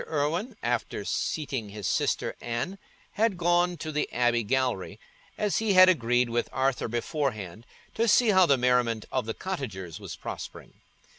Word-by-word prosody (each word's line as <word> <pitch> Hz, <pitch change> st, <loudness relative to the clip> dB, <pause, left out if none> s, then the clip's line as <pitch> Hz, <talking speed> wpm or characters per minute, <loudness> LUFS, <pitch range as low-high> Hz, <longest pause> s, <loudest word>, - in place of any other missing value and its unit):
Irwine, 160 Hz, -, -1 dB
after -, -, -2 dB
seating 135 Hz, -8 st, -2 dB
his 105 Hz, -1 st, -7 dB
sister -, -, 0 dB
Anne, 120 Hz, +12 st, -3 dB, 0.3 s
had 215 Hz, -3 st, +1 dB
gone 175 Hz, +1 st, +2 dB
to 155 Hz, +1 st, -5 dB
the 150 Hz, 0 st, -2 dB
abbey 120 Hz, -1 st, +2 dB
gallery, 120 Hz, -4 st, -1 dB, 0.4 s
as 210 Hz, -2 st, 0 dB
he 220 Hz, -2 st, +1 dB
had 185 Hz, 0 st, +8 dB
agreed 125 Hz, -6 st, +2 dB
with 120 Hz, 0 st, -1 dB
Arthur 130 Hz, -1 st, 0 dB
beforehand, 115 Hz, -, -3 dB, 0.3 s
to 230 Hz, +1 st, +1 dB
see 230 Hz, +2 st, +5 dB
how 185 Hz, -3 st, +6 dB
the 140 Hz, -, +4 dB
merriment 125 Hz, -3 st, +1 dB
of 130 Hz, -4 st, -1 dB
the 115 Hz, -, -3 dB
cottagers 105 Hz, -, -5 dB
was 95 Hz, -6 st, -7 dB
prospering. -, -, -8 dB
130 Hz, 155 wpm, -27 LUFS, 115-175 Hz, 0.4 s, had